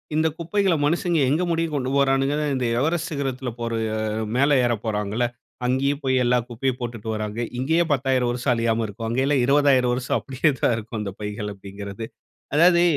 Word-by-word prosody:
இந்த 160 +1 +3
குப்பைகள 180 +2 +1
மனுசங்க 170 +1 +1
எங்க 160 +6 +2
முடிய 165 0 +1
கொண்டு 130 -2 -1
போறாணுங்கன்னா, 140 +2 +2
இந்த 130 - -1
எவரெஸ்ட் 165 +3 0
சிகரத்துல 135 -3 -3
போற 115 0 -3 0.7
மேல 140 +1 +4
ஏறப் 120 -3 -1
போறாங்கள்ல! 105 +2 0 0.4
அங்கேயும் 140 +3 +1
போய் 130 -1 +2
எல்லா 125 +1 +3
குப்பையும் 130 +2 -2
போட்டுட்டு 115 -2 -5
வராங்க. 105 +1 -4 0.2
இங்கேயே 160 +6 +2
10000 130 -2 +1
வருஷ்ம் 125 +1 0
அழியாம 115 -1 +1
இருக்கும். 115 +3 -6
அங்கே 130 +3 +1
எல்லாம் 140 -3 +2
20000 135 -3 +4
வருஷம் 125 0 0
அப்படியே 140 +3 +1
தான் 120 - +3
இருக்கும். 110 0 -6
அந்த 100 -2 -4
பைகள் 105 0 -4
அப்படிங்கிறது. 100 +2 -7 0.5
அதாவது 170 +2 +6
130 Hz, 165 wpm, -23 LUFS, 115-145 Hz, 0.7 s, அதாவது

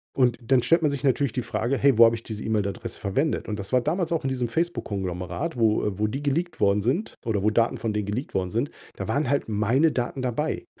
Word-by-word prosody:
Und 125 -3 +3
dann 125 +1 +2
stellt 165 0 +4
man 150 - +3
sich 140 0 -3
natürlich 135 -2 +2
die 125 - -2
Frage: 135 +3 -1
„Hey, 140 -1 +4
wo 115 - +10
habe 115 - +4
ich 115 - -8
diese 105 -2 -6
E-Mail-Adresse 105 -3 -2
verwendet?“ 135 +10 -1
Und 105 -1 -3
das 100 - -6
war 125 -1 +4
damals 170 +5 -1
auch 165 -3 0
in 135 - 0
diesem 125 -2 -1
Facebook 170 +8 -1
Konglomerat, 95 - -3
wo, 110 -2 +3
äh 105 -1 -3
wo 105 - +2
die 135 +7 -4
geleakt 170 +5 -1
worden 100 0 +3
sind 140 - -1
oder 105 -4 0
wo 105 - +4
Daten 115 +2 +2
von 110 -2 -2
denen 105 -2 -2
geleakt 115 +7 -3
worden 90 -1 -1
sind, 120 +6 -1 0.2
da - - -5
waren 145 -3 0
halt 140 0 +1
meine 115 +9 +2
Daten 130 0 -2
dabei. 150 - -2
120 Hz, 250 wpm, -25 LUFS, 105-140 Hz, 0.2 s, wo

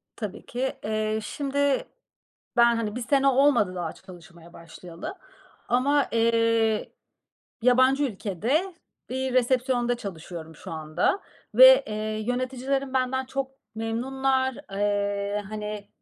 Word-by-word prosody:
Tabii 210 -2 -6
ki. 255 +2 -2
Eee, 215 0 -1
şimdi 280 +3 0 0.7
ben, 235 0 +6
hani 220 -2 -2
1 250 - -4
sene 275 +3 +2
olmadı 260 -8 +3
daha 175 -3 -3
çalışmaya 170 -2 -15
başlayalı 170 - -9 0.5
ama, 275 +4 +2
eee, 230 -1 +2 0.7
yabancı 255 +3 +4
ülkede 245 - -1 0.4
bir 260 0 -2
resepsiyonda 250 -1 +2
çalışıyorum 165 -5 -8
şu - - -10
anda 155 - 0 0.4
ve, - - +9
eee, 215 - -4 0.3
yöneticilerim 260 +2 -2
benden 260 0 0
çok 265 +1 -3 0.2
memnunlar. 260 +3 0 0.2
Eee, 205 0 -1
hani, 210 -1 -5
235 Hz, 110 wpm, -26 LUFS, 205-265 Hz, 0.7 s, ve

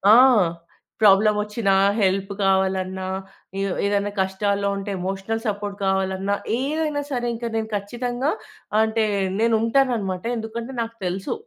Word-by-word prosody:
ఆ! - - +8 0.8
ప్రాబ్లమొచ్చినా, 210 0 +4 0.3
హెల్ప్ 195 0 +1
కావాలన్నా, 190 -1 +1 0.5
ఏ - - 0 0.2
ఏదైనా 200 0 +1
కష్టాల్లో 200 +1 0
ఉంటే 195 +1 -5
ఎమోషనల్ 195 +4 -3
సపోర్ట్ 205 -1 -2
కావాలన్నా, 190 +1 0 0.2
ఏదైనా 300 +2 -1
సరే 245 -3 -1
ఇంకా 235 +1 -4
నేను 220 -1 -1
ఖచ్చితంగా 245 +7 -2 0.5
అంటే 220 0 +2 0.4
నేనుంటాననమాట. 225 -4 +1
ఎందుకంటే 230 +3 -5
నాకు 230 0 -5
తెలుసు. 185 +2 -2
205 Hz, 110 wpm, -23 LUFS, 195-230 Hz, 0.8 s, ఆ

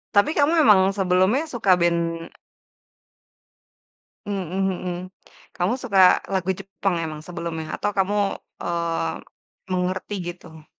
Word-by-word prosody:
Tapi 205 +10 +5
kamu 295 +3 +4
emang 195 -5 +6
sebelumnya 190 - +2
suka 200 -8 +3
band 170 -1 0 2.0
Mhm 200 -2 -2
mhm 185 -2 -1 0.6
kamu 180 +7 0
suka 200 -6 0 0.3
lagu 190 -1 -1
Jepang 195 -1 -2
emang 155 -1 -6
sebelumnya? 170 -2 -5
Atau 205 - -1
kamu, 195 +2 +2 0.5
eee, 170 - -2 0.5
mengerti 185 +2 -2 0.2
gitu 160 -3 -15
185 Hz, 105 wpm, -23 LUFS, 170-195 Hz, 2.0 s, emang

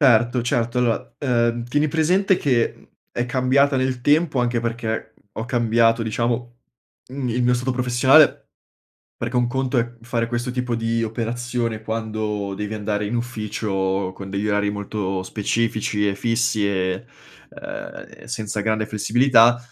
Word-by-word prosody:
Erto, 120 -2 +4
certo, 120 0 0
allora, 120 -2 0
uhm, 120 -3 +1
tieni 145 +5 +1
presente 180 +6 +2
che, 125 -7 +1
mhmm, - - -20 0.3
è 120 - -1
cambiata 130 +2 +2
nel 130 -1 -1
tempo 145 -2 +3
anche 120 -1 0
perché 115 -1 -3 0.2
ho 110 +2 -5
cambiato 115 -1 +2
diciamo, 120 +2 -2 0.5
mhmm, 130 -1 -4
il 125 +2 0
mio 125 0 +3
stato 125 +2 -1
professionale, 125 +4 +4 0.7
perché 125 - -4
un 120 - +2
conto 130 0 0
è 120 0 -2
fare 115 0 -1
questo 120 +1 -2
tipo 125 -1 -2
di 115 0 0
operazione 115 0 -2
quando 110 -2 -3
devi 105 +2 -4
andare 105 0 -2
in 120 - -2
ufficio 105 -5 -2
con 95 -1 -8
degli 100 +2 -2
orari 105 0 +1
molto 100 -2 -3
specifici 105 0 -1
e 100 - +1
fissi 115 -1 +1
e 95 -1 -1 0.4
uhm, - - -8 0.2
e - - -13
senza 110 -3 -3
grande 110 0 0
flessibilità 120 +3 +4
115 Hz, 150 wpm, -22 LUFS, 110-125 Hz, 0.7 s, Erto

